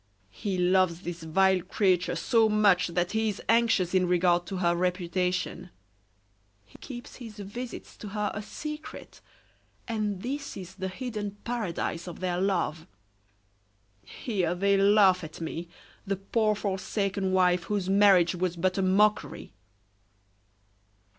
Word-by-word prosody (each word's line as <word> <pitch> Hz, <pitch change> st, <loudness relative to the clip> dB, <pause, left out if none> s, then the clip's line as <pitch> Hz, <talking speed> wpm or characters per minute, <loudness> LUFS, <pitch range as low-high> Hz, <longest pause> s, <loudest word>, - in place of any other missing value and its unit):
He 195 Hz, -, -3 dB
loves 180 Hz, -1 st, +2 dB
this 175 Hz, -2 st, -6 dB
vile 190 Hz, +3 st, +3 dB
creature 180 Hz, -1 st, +1 dB
so 225 Hz, -3 st, +3 dB
much 200 Hz, -5 st, +4 dB
that 175 Hz, +1 st, -1 dB
he 220 Hz, 0 st, +1 dB
is 205 Hz, -, -4 dB
anxious 225 Hz, -6 st, +3 dB
in 185 Hz, -1 st, +3 dB
regard 175 Hz, 0 st, +2 dB
to 195 Hz, -, -4 dB
her 175 Hz, -1 st, +2 dB
reputation; 180 Hz, 0 st, -1 dB, 1.0 s
he 105 Hz, -, -18 dB
keeps 245 Hz, -3 st, -9 dB
his 225 Hz, -4 st, -10 dB
visits 220 Hz, +5 st, -7 dB
to 210 Hz, -, -8 dB
her 210 Hz, +1 st, -2 dB
a 210 Hz, -, -4 dB
secret, 300 Hz, +8 st, -8 dB, 0.7 s
and 210 Hz, -4 st, -2 dB
this 275 Hz, +1 st, -4 dB
is 185 Hz, -1 st, -8 dB
the 190 Hz, 0 st, -4 dB
hidden 205 Hz, -1 st, -5 dB
paradise 185 Hz, -7 st, -3 dB
of 175 Hz, -, -8 dB
their 180 Hz, -1 st, -1 dB
love. 175 Hz, -5 st, -1 dB, 1.2 s
Here 185 Hz, -7 st, -2 dB
they 200 Hz, +2 st, +2 dB
laugh 195 Hz, -2 st, +5 dB
at 155 Hz, -1 st, -9 dB
me, 165 Hz, +1 st, -5 dB, 0.4 s
the 195 Hz, -, 0 dB
poor 215 Hz, +3 st, 0 dB
forsaken 195 Hz, -1 st, -2 dB
wife, 180 Hz, -2 st, +3 dB
whose 205 Hz, -3 st, -2 dB
marriage 195 Hz, -3 st, +5 dB
was 180 Hz, -1 st, -1 dB
but 185 Hz, +2 st, 0 dB
a -, -, +2 dB
mockery." 205 Hz, +3 st, +1 dB
190 Hz, 135 wpm, -28 LUFS, 180-210 Hz, 1.2 s, laugh